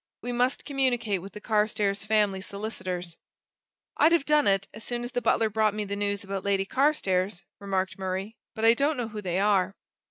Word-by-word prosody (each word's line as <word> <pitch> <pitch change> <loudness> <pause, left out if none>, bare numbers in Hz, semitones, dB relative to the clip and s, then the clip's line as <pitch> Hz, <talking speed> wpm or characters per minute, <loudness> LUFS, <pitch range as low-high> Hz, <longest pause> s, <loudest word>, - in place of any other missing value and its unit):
We 245 - -2
must 250 +2 0
communicate 245 - 0
with 195 +1 -10
the - - -7
Carstairs 210 -2 0
family 210 -3 +2
solicitors." 185 -4 -5 0.8
"I'd 320 +3 +5
have 335 -5 +3
done 300 -1 +3
it, 195 0 +2
as 220 - -10
soon 240 +1 -3
as 245 - -5
the 245 -1 -1
butler 225 0 +3
brought 215 -1 +2
me 210 -1 -2
the 200 0 -3
news 200 0 -1
about 195 -1 -4
Lady 195 -1 +1
Carstairs," 195 - +1 0.2
remarked 190 -1 -2
Murray, 190 +3 -3 0.2
"but 220 0 -1
I 230 - +8
don't 285 +4 +1
know 240 -2 -2
who 210 -1 -6
they 180 -2 -2
are." 195 -1 +2
210 Hz, 195 wpm, -27 LUFS, 195-235 Hz, 0.8 s, I